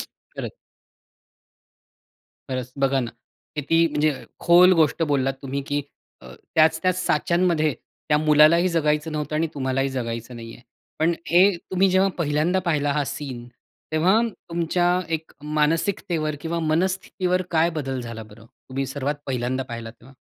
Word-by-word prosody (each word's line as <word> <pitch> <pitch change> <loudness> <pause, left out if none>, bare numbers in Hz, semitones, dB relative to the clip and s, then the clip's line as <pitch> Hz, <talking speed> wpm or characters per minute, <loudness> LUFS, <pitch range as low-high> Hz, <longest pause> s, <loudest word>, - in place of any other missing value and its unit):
खरंच. - - -9 1.9
खरंच 130 -1 -4
बघा 135 0 +2
ना, 120 -2 -4 0.5
किती 165 +3 +3
म्हणजे 150 +1 +2 0.3
खोल 180 +2 +6
गोष्ट 155 +2 +2
बोललात 135 -3 +1
तुम्ही, 140 +1 -3
की 145 0 -1 0.4
अ, 65 0 -12 0.2
त्याच-त्याच 160 +3 +3
साच्यांमध्ये 165 -2 +2 0.3
त्या 150 - +4
मुलालाही 155 +4 +5
जगायचं 155 -2 0
नव्हतं 150 0 -3
आणि 165 - +1
तुम्हालाही 135 0 0
जगायचं 120 -2 -4
नाहीये. 115 0 -10 0.4
पण 165 +2 +3
हे 180 +3 +5
तुम्ही 185 +2 +1
जेव्हा 190 +1 +4
पहिल्यांदा 155 +3 +1
पाहिला 145 -3 +1
हा 145 0 0
सीन, 130 -4 -6 0.5
तेव्हा 185 +8 +4 0.3
तुमच्या 170 +1 +1 0.3
एक 160 0 -6
मानसिकतेवर 155 +1 0
किंवा 170 +2 -3
मनस्थितीवर 180 +2 0
काय 165 0 +3
बदल 135 -5 -3
झाला 115 -2 -7
बरं, 110 +1 -15
तुम्ही 135 +3 -6
सर्वात 140 +1 -2
पहिल्यांदा 130 0 -1
पाहिला 115 -1 -6
तेव्हा? 125 +3 -18
150 Hz, 135 wpm, -23 LUFS, 135-170 Hz, 1.9 s, खोल